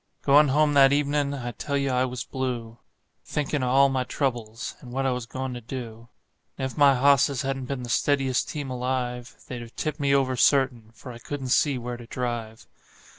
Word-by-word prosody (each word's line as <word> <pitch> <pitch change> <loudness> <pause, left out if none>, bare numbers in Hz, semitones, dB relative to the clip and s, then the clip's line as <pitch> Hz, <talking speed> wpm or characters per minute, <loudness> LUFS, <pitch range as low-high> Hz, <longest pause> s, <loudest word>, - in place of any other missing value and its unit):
Goin' 145 +2 +6
home 150 +2 +3
that 135 -1 +6
evenin' 145 0 +1
I 120 -3 -5
tell 140 +5 -3
you 140 -1 0
I 125 0 +2
was 125 -1 -4
blue, 120 -3 -4 0.4
Thinkin' 145 -1 -2
of 125 - 0
all 135 +2 +5
my 130 -1 0
troubles, 120 -4 -3
and 125 - -11
what 135 +2 -1
I 135 - +2
was 125 -2 -4
goin' 130 +1 -4
to 120 - -7
do; 115 -1 -8 0.5
And 130 - -2
if 130 - -5
my 140 -2 +5
hosses 140 0 +3
hadn't 135 -1 -3
been 125 -1 -4
the 120 - -7
steadiest 135 -1 +1
team 145 -3 -5
alive, 125 -1 -3
They'd 125 -2 -6
've 115 - -14
tipped 155 -2 -3
me 140 -1 +1
over, 130 -2 +1
certain, 125 -4 +2
for 125 - -10
I 120 - -10
couldn't 135 0 -5
see 140 +1 +3
where 120 0 -5
to 120 -1 -12
drive. 120 -3 -4
130 Hz, 205 wpm, -25 LUFS, 120-140 Hz, 0.5 s, Goin